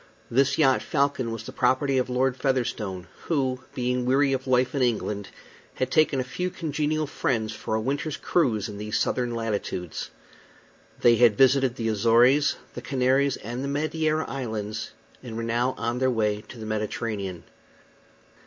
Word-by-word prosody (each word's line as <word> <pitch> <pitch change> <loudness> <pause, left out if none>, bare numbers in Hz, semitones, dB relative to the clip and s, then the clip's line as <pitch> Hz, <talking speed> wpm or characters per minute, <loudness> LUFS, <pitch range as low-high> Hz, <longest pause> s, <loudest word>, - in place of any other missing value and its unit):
This 135 +3 +3
yacht 135 -4 +4
Falcon 140 -4 0
was 115 -1 -5
the - - -8
property 130 +2 +2
of 130 - -1
Lord 125 +1 +1
Featherstone, 120 -9 -1 0.2
who, 130 -5 0 0.2
being 125 0 0
weary 135 +2 +3
of 130 0 -3
life 130 0 +2
in 140 - 0
England, 105 -4 0 0.5
had 130 - -2
taken 155 -4 +3
a - - +1
few 180 +8 -3
congenial 155 -2 -1
friends 110 -6 -1
for 110 - -3
a - - +1
winter's 140 +6 -2
cruise 115 - +1
in 105 -2 -8
these 105 0 -2
southern 120 -2 0
latitudes. 105 -6 -3 0.9
They 120 -1 +6
had 115 -4 +5
visited 130 -1 +4
the 115 -3 -2
Azores, 120 +7 +4 0.2
the - - -6
Canaries, 135 +1 +1
and 120 +5 -5
the - - -2
Madeira 155 +2 0
Islands, 110 -5 -4 0.3
and 115 -3 -7
were 115 - -3
now 120 +3 0
on 120 +2 -2
their 130 0 +2
way 105 -3 0
to - - -11
the 110 - -7
Mediterranean. 105 -3 -3
125 Hz, 165 wpm, -26 LUFS, 110-135 Hz, 0.9 s, They